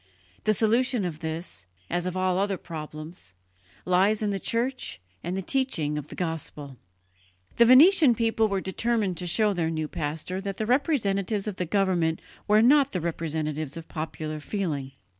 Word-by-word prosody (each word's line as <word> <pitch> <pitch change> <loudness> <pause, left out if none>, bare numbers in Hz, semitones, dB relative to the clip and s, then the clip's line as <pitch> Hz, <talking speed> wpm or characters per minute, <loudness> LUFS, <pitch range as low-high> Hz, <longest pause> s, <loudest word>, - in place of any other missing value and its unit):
The 215 - +4
solution 235 0 +2
of 160 -4 -4
this, 160 - -5 0.2
as 175 - -1
of 185 0 -3
all 185 0 +1
other 200 -1 0
problems, 155 - -9 0.5
lies 195 +4 +3
in 205 - 0
the 195 - -2
Church 230 - -2 0.2
and 180 +3 -3
the 195 - -3
teaching 195 - 0
of 150 -1 -5
the - - -10
Gospel." 150 -5 -5 0.8
The 235 - +7
Venetian 280 +1 +7
people 225 -1 +2
were 195 -2 -1
determined 205 -1 -1
to 180 - -4
show 210 +4 +3
their 170 -3 -1
new 155 -1 -2
pastor 160 +5 -4
that 195 0 -4
the 215 - -1
representatives 215 - +1
of 200 -3 -4
the 180 - -2
government 175 -4 +1 0.3
were 215 +1 +5
not 280 +2 +5
the 180 - 0
representatives 155 -3 -3
of 165 - -8
popular 155 -1 -5
feeling. 150 -6 -3
185 Hz, 165 wpm, -26 LUFS, 160-215 Hz, 0.8 s, The